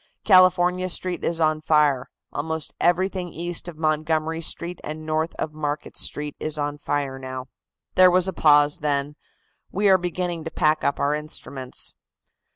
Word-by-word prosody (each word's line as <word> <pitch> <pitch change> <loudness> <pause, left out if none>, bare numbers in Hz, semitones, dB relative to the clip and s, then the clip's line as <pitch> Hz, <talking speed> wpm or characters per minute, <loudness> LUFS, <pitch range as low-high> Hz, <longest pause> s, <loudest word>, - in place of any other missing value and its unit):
California 185 -1 +4
Street 180 0 -2
is 165 0 -1
on 155 -1 +2
fire. 150 -5 +2 0.2
Almost 160 +1 -4
everything 180 +1 +1
east 175 +1 -3
of 170 -3 -8
Montgomery 155 +1 0
Street 170 +2 -1
and 155 +1 -6
north 155 +1 -1
of 155 - -4
Market 150 -1 -4
Street 150 0 -2
is 155 0 -3
on 145 0 -3
fire 140 -2 -2
now." 130 0 -7 0.4
There 185 0 +7
was 180 +1 +4
a 190 - -2
pause, 145 -1 +4
then: 145 0 -1 0.6
"We 200 +2 +2
are 190 -1 +6
beginning 175 -1 -3
to - - -3
pack 155 -1 +1
up 140 - 0
our 140 +1 +1
instruments." 140 -3 -3
155 Hz, 160 wpm, -23 LUFS, 150-175 Hz, 0.6 s, There